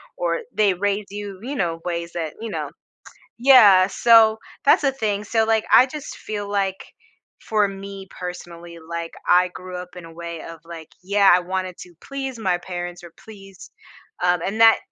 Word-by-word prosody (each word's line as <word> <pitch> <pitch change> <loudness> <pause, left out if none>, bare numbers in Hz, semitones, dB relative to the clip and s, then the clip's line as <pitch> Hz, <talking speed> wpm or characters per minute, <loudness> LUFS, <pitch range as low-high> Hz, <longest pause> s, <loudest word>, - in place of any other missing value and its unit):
or 170 -1 -1
they 200 -2 +2
raise 200 +2 -1
you, 200 -1 -7
you 265 +5 -5
know, 165 -7 -2
ways 170 -1 -3
that, 160 -3 -4
you 225 0 -6
know - - -4 0.7
Yeah, 215 -8 +7
so, 225 0 +5 0.3
that's 285 - +5
the 275 -2 +2
thing, 210 -5 -2
so, 225 +1 +1
like, 220 -1 +1
I 255 - +8
just 290 +2 -8
feel 205 -1 -6
like 195 -2 -3 0.5
for 210 -2 +1
me, 195 0 -9
personally, 175 -2 -9
like, 170 +1 -6 0.2
I 180 +1 +5
grew 180 0 -9
up 180 0 -9
in 180 - -10
a 165 - -12
way 170 -1 -7
of, 165 0 -10
like, 165 -1 -10 0.2
yeah, 200 +1 +4
I 175 - +6
wanted 185 0 -4
to 175 -1 -12
please 270 -2 -6
my 190 -6 0
parents 175 0 -7
or 170 - -12
please, 195 -4 -14 0.5
um 180 -1 +2
and 210 +4 -3
that 225 0 +7
190 Hz, 180 wpm, -22 LUFS, 175-215 Hz, 0.7 s, I